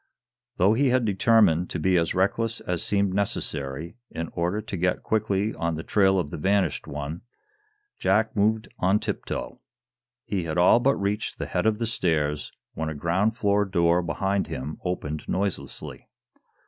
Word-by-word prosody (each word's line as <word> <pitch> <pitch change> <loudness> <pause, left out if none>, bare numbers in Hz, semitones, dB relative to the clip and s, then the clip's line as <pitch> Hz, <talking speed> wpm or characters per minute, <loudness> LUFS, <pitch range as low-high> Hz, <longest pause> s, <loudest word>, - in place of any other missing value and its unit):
Though 95 +4 +4
he 135 +4 +3
had 125 -1 +2
determined 100 -4 +3
to - - -3
be 90 +4 +2
as 85 0 +1
reckless 115 +5 +1
as 90 -2 -2
seemed 100 -2 +1
necessary 80 - -2
in 80 0 -5
order 90 +4 -1
to 110 -2 -5
get 90 0 0
quickly 105 -1 0
on 85 -2 -2
the 80 - -5
trail 95 -2 +3
of 85 -5 -1
the - - -5
vanished 95 -2 +1
one, 75 +4 -5 0.8
Jack 110 +1 +2
moved 110 +1 +2
on 95 +3 +3
tip - - -4
toe. - - -5 0.7
He 95 -4 -2
had 80 +1 -3
all 90 +6 +6
but 135 +3 +3
reached 100 +2 -2
the - - -3
head - - 0
of 110 -1 +2
the 115 - -1
stairs 75 -9 -1 0.2
when 80 -1 -3
a 80 - -5
ground 95 +9 0
floor 105 -3 +2
door 85 -3 +2
behind 95 +3 -1
him 70 +3 -5
opened 80 -4 -3
noiselessly. 100 0 -4
95 Hz, 170 wpm, -25 LUFS, 85-105 Hz, 0.8 s, all